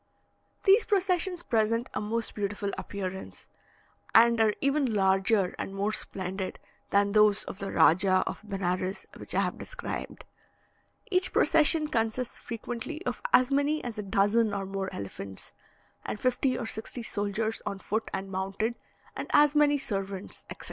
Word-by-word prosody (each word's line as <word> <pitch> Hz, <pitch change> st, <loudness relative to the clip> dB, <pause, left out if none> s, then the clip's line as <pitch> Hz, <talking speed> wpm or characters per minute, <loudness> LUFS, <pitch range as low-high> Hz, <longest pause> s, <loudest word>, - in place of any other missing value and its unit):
These 410 Hz, +3 st, +5 dB
processions 365 Hz, -3 st, +1 dB
present 230 Hz, +2 st, +1 dB
a -, -, -2 dB
most 225 Hz, +2 st, -2 dB
beautiful 205 Hz, 0 st, -2 dB
appearance, 190 Hz, -1 st, -6 dB, 0.7 s
and 235 Hz, 0 st, +6 dB
are 215 Hz, -1 st, +3 dB
even 275 Hz, -4 st, +1 dB
larger 195 Hz, 0 st, +2 dB
and 195 Hz, -, -4 dB
more 200 Hz, +2 st, 0 dB
splendid 190 Hz, -2 st, -4 dB, 0.3 s
than 200 Hz, 0 st, +3 dB
those 210 Hz, -1 st, +4 dB
of 195 Hz, -, -8 dB
the 195 Hz, -, -4 dB
Rajah 185 Hz, +3 st, +4 dB
of -, -, -5 dB
Benares, 190 Hz, -2 st, -2 dB
which -, -, -6 dB
I -, -, +4 dB
have -, -, -2 dB
described. -, -, -6 dB, 0.9 s
Each 370 Hz, 0 st, +2 dB
procession 315 Hz, 0 st, +5 dB
consists 230 Hz, -2 st, -1 dB
frequently 240 Hz, -, -6 dB
of -, -, -3 dB
as 255 Hz, +1 st, +5 dB
many 285 Hz, +2 st, +1 dB
as 235 Hz, -3 st, -5 dB
a -, -, -3 dB
dozen 205 Hz, +2 st, +2 dB
or 195 Hz, -1 st, -2 dB
more 195 Hz, 0 st, -3 dB
elephants, 100 Hz, -1 st, -7 dB, 0.5 s
and 210 Hz, -, -4 dB
fifty 255 Hz, 0 st, +1 dB
or 245 Hz, -, -3 dB
sixty 225 Hz, +2 st, -5 dB
soldiers 215 Hz, +1 st, -2 dB
on 200 Hz, -, -2 dB
foot 220 Hz, +3 st, -3 dB
and 195 Hz, 0 st, -4 dB
mounted, 195 Hz, +5 st, -2 dB, 0.4 s
and -, -, -5 dB
as 295 Hz, -1 st, +6 dB
many 295 Hz, -1 st, +4 dB
servants, 195 Hz, -7 st, -4 dB
etc. -, -, -8 dB
215 Hz, 150 wpm, -28 LUFS, 195-255 Hz, 0.9 s, and